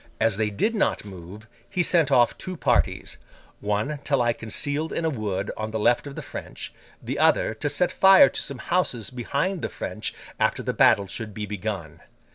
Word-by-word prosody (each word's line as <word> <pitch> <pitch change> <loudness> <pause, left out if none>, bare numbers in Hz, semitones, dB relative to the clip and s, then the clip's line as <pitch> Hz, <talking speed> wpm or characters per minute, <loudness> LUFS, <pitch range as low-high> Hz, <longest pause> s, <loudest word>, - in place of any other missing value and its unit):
As 110 -2 +2
they 110 -1 +1
did 105 - 0
not 210 - 0
move, 95 +2 -10 0.2
he 180 -2 0
sent 165 -4 +3
off 120 -3 +4
two 185 -1 -6
parties:—one 105 -1 -2
to 140 -1 +1
lie 120 -2 +2
concealed 145 +8 -2
in 165 - -2
a 160 - +1
wood 100 -6 -3
on 110 0 -4
the 110 - -3
left 120 +6 +2
of 140 - -8
the - - -6
French: - - -8 0.3
the - - -3
other, - - +3
to 130 +7 -3
set 180 +4 +2
fire 190 -5 +7
to - - -3
some 140 - -5
houses 125 - -1
behind 140 +9 -2
the - - -2
French - - -4 0.2
after - - +1
the - - -2
battle 100 - +4
should 110 +1 -6
be 105 - -3
begun. 100 -6 -5
120 Hz, 190 wpm, -25 LUFS, 105-150 Hz, 0.3 s, fire